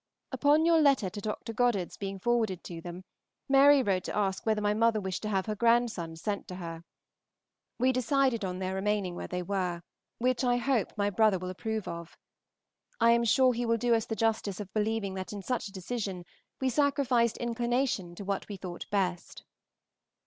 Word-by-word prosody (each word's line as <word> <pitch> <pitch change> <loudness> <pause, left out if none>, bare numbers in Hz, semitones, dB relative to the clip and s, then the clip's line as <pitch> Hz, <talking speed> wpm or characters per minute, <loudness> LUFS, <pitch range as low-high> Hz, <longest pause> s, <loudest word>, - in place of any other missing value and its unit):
Upon 300 +2 +3
your 330 -1 +5
letter 270 -10 +3
to 205 - -6
Dr. 215 +2 -4
Goddard's 225 -6 +1
being 195 -1 -5
forwarded 220 -3 0
to 170 -2 -7
them, 175 +2 -8 0.4
Mary 275 0 +6
wrote 190 -4 0
to - - -4
ask 195 0 -1
whether 215 -1 +2
my 205 0 +1
mother 225 0 +2
wished 190 -2 -4
to 215 - -3
have 190 -2 0
her 215 - -2
grandsons 220 -8 +1
sent 205 -2 -2
to 180 - -7
her. 165 -2 -7 0.9
We 255 +2 +3
decided 255 -2 +1
on 180 -1 -3
their 185 0 -3
remaining 195 -1 -1
where - - -6
they 180 0 -3
were, 180 -2 -2 0.3
which 255 +1 +1
I 245 -1 +3
hope 245 -4 0
my 205 0 +1
brother 210 0 +3
will 185 +1 -5
approve 220 +3 -4
of. 170 0 -7 0.8
I 230 0 +5
am 235 0 +3
sure 255 +3 +4
he 240 +1 -2
will 230 0 +2
do 240 +1 +2
us 225 -1 +1
the 225 - -2
justice 220 -4 0
of 200 -2 -7
believing 215 -2 -1
that 190 +2 -5
in 200 -1 -6
such 250 -1 -2
a - - -11
decision 195 -2 -4 0.3
we 265 - +1
sacrificed 260 -4 +2
inclination 240 -6 -1
to 200 - -8
what 195 +1 -3
we 200 - -5
thought 180 -2 -7
best. 185 -3 -2
210 Hz, 190 wpm, -29 LUFS, 190-240 Hz, 0.9 s, Mary